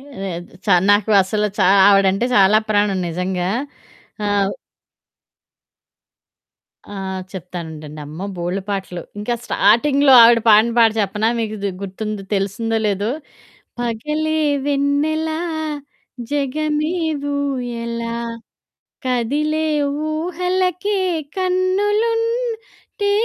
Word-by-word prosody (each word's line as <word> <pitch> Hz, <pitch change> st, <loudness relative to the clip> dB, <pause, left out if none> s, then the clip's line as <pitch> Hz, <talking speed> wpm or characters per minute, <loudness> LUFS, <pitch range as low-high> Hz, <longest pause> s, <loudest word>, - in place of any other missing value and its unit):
లేదు 195 Hz, -11 st, -7 dB, 0.2 s
చ -, -, -5 dB, 0.2 s
నాకు 205 Hz, +1 st, +3 dB
అసలు 210 Hz, +3 st, -1 dB
చా -, -, +4 dB, 0.2 s
ఆవిడంటే 195 Hz, +2 st, +3 dB
చాలా 200 Hz, +2 st, +6 dB
ప్రాణం 205 Hz, -2 st, +2 dB
నిజంగా. 180 Hz, +1 st, -2 dB, 0.8 s
ఆహ్ 200 Hz, -1 st, +1 dB, 2.4 s
ఆ! -, -, -14 dB, 0.4 s
చెప్తానుండండి 160 Hz, -5 st, -8 dB
అమ్మో! 160 Hz, +6 st, -7 dB
బోల్డు 175 Hz, +3 st, -2 dB
పాటలు. 190 Hz, -3 st, -4 dB, 0.2 s
ఇంకా 210 Hz, +4 st, -2 dB
స్టార్టింగ్‌లో 275 Hz, +7 st, +3 dB
ఆవిడ 230 Hz, 0 st, +6 dB
పాడిన 220 Hz, +2 st, +6 dB
పాట 225 Hz, -1 st, +6 dB
చెప్పనా? 210 Hz, +2 st, 0 dB
మీకిది 215 Hz, -3 st, -2 dB
గుర్తుందో 205 Hz, +1 st, -5 dB
తెలిసిందో 215 Hz, +4 st, -1 dB
లేదో 205 Hz, +1 st, 0 dB, 0.7 s
పగలే 300 Hz, +7 st, -2 dB, 0.3 s
వెన్నెలా, 290 Hz, +3 st, 0 dB, 0.9 s
జగమే 300 Hz, +3 st, -1 dB, 0.4 s
ఊయలా. 235 Hz, -4 st, -3 dB, 0.9 s
కదిలే 290 Hz, +6 st, 0 dB, 0.5 s
ఊహలకే 360 Hz, +4 st, -1 dB, 0.4 s
కన్నులుంటే, 415 Hz, +4 st, -1 dB
230 Hz, 85 wpm, -19 LUFS, 200-310 Hz, 2.4 s, చాలా